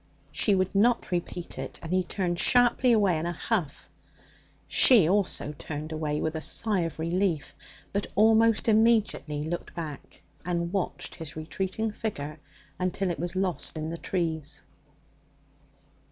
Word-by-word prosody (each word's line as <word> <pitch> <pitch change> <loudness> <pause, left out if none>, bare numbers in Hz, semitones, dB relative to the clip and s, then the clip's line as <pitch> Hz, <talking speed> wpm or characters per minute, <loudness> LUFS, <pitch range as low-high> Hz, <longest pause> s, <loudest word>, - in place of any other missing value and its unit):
She 205 - +2
would 185 0 0
not 230 +3 +2
repeat 175 -4 -4
it, 135 - -6
and 165 +2 -4
he 185 0 +3
turned 175 -1 -2
sharply 245 +2 +4
away 200 -7 +3
in 165 - -2
a - - -1
huff. 175 -4 -2 0.8
She 225 -11 +6
also 185 -5 0
turned 155 +1 -5
away 155 -1 -2
with 160 0 -2
a 160 - -3
sigh 210 +4 +1
of 165 -2 -2
relief, 170 -1 -1 0.4
but 200 0 -1
almost 225 +1 +4
immediately 215 -9 +2
looked 170 +3 -5
back, 155 -4 -7 0.2
and 170 0 -2
watched 195 -3 -3
his 160 -3 -8
retreating 190 +7 -3
figure 155 -9 -5 0.4
until 185 +1 0
it 170 - -5
was 175 +1 -3
lost 185 -3 -2
in 155 +1 -3
the 170 - -4
trees. 160 -5 -2
175 Hz, 145 wpm, -28 LUFS, 160-205 Hz, 0.8 s, She